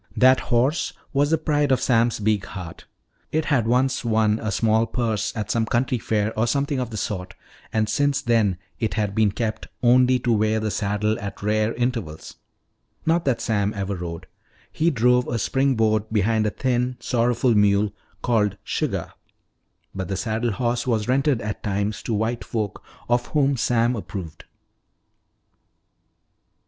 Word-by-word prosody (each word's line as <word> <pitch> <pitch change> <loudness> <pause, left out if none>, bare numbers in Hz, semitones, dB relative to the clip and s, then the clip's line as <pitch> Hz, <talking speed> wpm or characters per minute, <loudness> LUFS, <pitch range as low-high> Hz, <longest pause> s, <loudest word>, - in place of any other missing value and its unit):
That 130 +1 +6
horse 130 +6 +1 0.2
was 145 +1 +2
the 160 - +3
pride 145 -2 +1
of 130 - +3
Sam's 115 -2 +2
big 105 -2 +1
heart. 90 -4 -8 0.5
It 155 0 0
had 125 -7 +1
once 130 +2 +1
won 110 -2 +2
a 110 - -2
small 110 0 +2
purse 110 -3 -1
at 105 0 -2
some 115 -1 +1
country 125 +1 0
fair 110 0 0
or 110 +2 +1
something 140 +2 0
of 125 -2 -2
the 110 - -6
sort, 95 -3 -4 0.4
and 110 -1 +1
since 140 +5 +1
then 115 -7 +2 0.2
it 110 - -1
had 105 -3 -1
been 110 -1 +3
kept 110 0 -3 0.2
only 125 +1 +5
to 120 -1 0
wear 110 0 +2
the 110 -1 -2
saddle 105 +2 -1
at 100 0 -7
rare 110 +2 +1
intervals. 115 -11 -3 0.7
Not 165 +1 +2
that 135 -4 +1
Sam 105 -1 0
ever 100 0 -2
rode. 85 -2 -6 0.5
He 165 +2 +1
drove 125 -2 +3
a 120 - -1
spring 135 +4 +1
board 110 -1 +2
behind 110 +1 +2
a - - +2
thin, 125 +2 -1
sorrowful 120 +1 +1
mule 105 0 +3 0.3
called 105 -4 +1
"Suggah." - - -2 0.8
But 95 -2 -4
the 95 - -3
saddle 110 +3 -1
horse 120 +2 -1
was 110 -3 0
rented 135 -1 +2
at 105 0 -4
times 100 +1 -2
to 115 - -2
white 115 +3 -1
folk 105 -4 -3 0.3
of 120 0 +1
whom 140 -2 +2
Sam 120 0 +1
approved. 90 -7 -7
115 Hz, 160 wpm, -23 LUFS, 105-125 Hz, 0.8 s, That